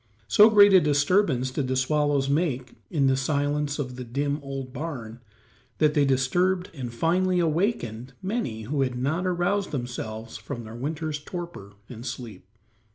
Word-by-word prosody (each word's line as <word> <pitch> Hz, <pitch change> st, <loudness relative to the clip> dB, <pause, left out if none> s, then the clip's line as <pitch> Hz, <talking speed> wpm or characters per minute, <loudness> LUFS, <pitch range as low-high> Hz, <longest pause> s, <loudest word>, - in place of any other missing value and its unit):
So 210 Hz, -, +7 dB
great 205 Hz, -2 st, +7 dB
a 185 Hz, -, +8 dB
disturbance 145 Hz, -3 st, +2 dB
did 130 Hz, 0 st, -2 dB
the 130 Hz, -, 0 dB
swallows 145 Hz, +1 st, +1 dB
make 140 Hz, -4 st, 0 dB, 0.2 s
in 150 Hz, -6 st, +1 dB
the 135 Hz, 0 st, +4 dB
silence 145 Hz, +1 st, 0 dB
of 125 Hz, -4 st, -4 dB
the 125 Hz, -, -5 dB
dim, 140 Hz, +4 st, -2 dB
old 135 Hz, -2 st, -6 dB
barn 125 Hz, -8 st, -6 dB, 0.6 s
that 150 Hz, -1 st, +3 dB
they 145 Hz, -2 st, +3 dB
disturbed 175 Hz, +8 st, +1 dB
and 130 Hz, -6 st, -5 dB
finally 180 Hz, +8 st, +1 dB
awakened 155 Hz, -, -1 dB
many 190 Hz, -, -3 dB
who 140 Hz, +5 st, -1 dB
had 125 Hz, -2 st, 0 dB
not 155 Hz, +9 st, -1 dB
aroused 185 Hz, +3 st, 0 dB
themselves 115 Hz, -4 st, -5 dB
from 110 Hz, +3 st, -7 dB
their 110 Hz, 0 st, -9 dB
winter's 150 Hz, +4 st, -3 dB
torpor 170 Hz, -, -7 dB
and 120 Hz, -1 st, -9 dB
sleep. 120 Hz, -5 st, -7 dB
140 Hz, 160 wpm, -26 LUFS, 125-165 Hz, 0.6 s, a